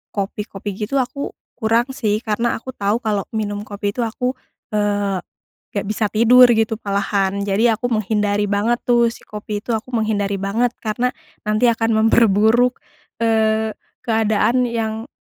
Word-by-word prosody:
kopi-kopi 200 0 -4
gitu 275 - -3
aku 275 +2 -2 0.2
kurang 230 +4 +1
sih 215 -4 -1
karena 230 +2 0
aku 260 - -7
tahu 210 0 -1
kalau 210 -3 -1
minum 205 -1 -3
kopi 205 0 -3
itu 225 - -10
aku, 250 +3 -2 0.4
eee, 205 -2 0 0.5
gak 200 -1 -3
bisa 215 0 -1
tidur 235 +3 +6
gitu 220 -1 +2
malahan 200 -1 -1
jadi 220 +3 +2
aku 245 - -1
menghindari 210 -2 0
banget 205 +4 +1
tuh 240 -1 +4
si 230 - -7
kopi 210 0 -6
itu, 240 - -3
aku 225 +1 -2
menghindari 205 -3 0
banget 220 +5 0
karena 240 +3 -1 0.3
nanti 215 +3 +3
akan 225 -1 0
memperburuk, 225 +2 +4 0.5
eee, 220 -1 +2 0.3
keadaan 225 +2 +2
yang 225 0 -3
220 Hz, 145 wpm, -20 LUFS, 205-235 Hz, 0.5 s, tidur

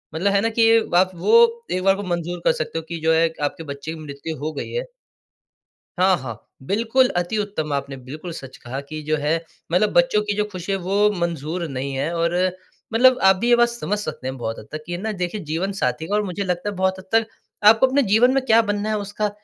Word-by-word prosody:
मतलब 195 +5 +1
है 200 - +3
ना? 225 - +1
कि 225 0 +4 0.2
आप 185 +1 +4
वो 465 - +4
एक 185 - -1
बार 195 0 +4
को 200 - -5
मंज़ूर 175 -1 -3
कर - - +6
सकते 155 - -3
हो - - -8
कि 170 -1 -4
जो 160 +1 +3
है 165 +1 +3
आपके 145 +3 -2
बच्चे 140 +2 -6
की 160 - -9
मृत्यु 150 +1 -7
हो 155 - -1
गई 145 - -5
है। - - -2 1.2
हाँ, 185 0 +5
हाँ। 115 -4 -7 0.3
बिल्कुल, 230 - +2
अति 175 +4 -1
उत्तम 200 -8 -3
आपने 140 -1 -3
बिल्कुल 150 +7 -8
सच 135 -5 -9
कहा 130 +3 -6
कि 155 +2 -7
जो 155 +1 0
है 150 +2 0 0.4
मतलब 195 +4 +3
बच्चों 260 -5 +3
की 210 -1 -2
जो 210 - +1
ख़ुशी 185 +1 -4
है 195 - 0
वो 200 +3 +2
मंज़ूर 170 0 -2
नहीं 135 +1 -4
है 140 +5 -1
और 170 0 0 0.6
मतलब 250 +3 +5
आप 190 0 +6
भी 235 +6 -1
ये 240 - +6
बात 240 0 +4
समझ 235 -3 -3
सकते 205 -10 -6
हैं 130 - -5
बहुत 115 -1 -4
हद 110 - -11
तक 155 0 -5
कि 175 +1 -3
ना 220 +3 -3
देखिए 180 +2 -3
जीवन 180 +5 -1
साथी 160 -4 -2
का 205 - -2
और 210 - +2
मुझे 200 +1 -3
लगता 180 +2 -2
है 205 - -3
बहुत 190 0 0
हद 190 - -10
तक 225 0 +4 0.4
आपको 225 +4 +7
अपने 275 +2 +2
जीवन 225 +3 +4
में 270 -1 +1
क्या 225 -1 +6
बनना 205 0 -2
है 215 - +1
उसका, 205 +1 -2
185 Hz, 240 wpm, -22 LUFS, 155-210 Hz, 1.2 s, आपको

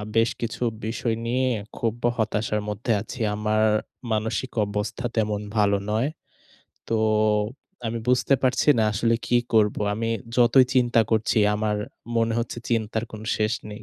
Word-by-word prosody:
বেশ 115 +1 +4
কিছু 120 +2 -3 0.2
বিষয় 115 0 -1
নিয়ে 130 +2 +1 0.3
খুব 115 +1 -2 0.2
হতাশার 105 -1 0
মধ্যে 105 +3 -2
আছি। 120 +3 -8 0.2
আমার 110 0 +1 0.5
মানসিক 110 +4 -1
অবস্থা 105 +4 -3
তেমন 105 -2 0 0.2
ভালো 100 -1 +3
নয়। 110 +6 +1 0.8
তো - - 0 0.9
আমি 115 +1 -2
বুঝতে 125 +2 +3
পারছি 130 +3 +2
না - - +4
আসলে 115 +3 +2
কি - - 0 0.2
করব? 105 -2 +4 0.2
আমি 115 +1 -2 0.3
যতই 125 +2 +6
চিন্তা 120 -2 +4
করছি, 110 0 +1 0.2
আমার 105 0 0 0.4
মনে 115 0 +2
হচ্ছে 115 0 -3
চিন্তার 110 -1 0
কোন 110 - -7 0.2
শেষ 110 0 +1 0.2
নেই। 105 +2 -9
110 Hz, 145 wpm, -24 LUFS, 105-120 Hz, 0.9 s, যতই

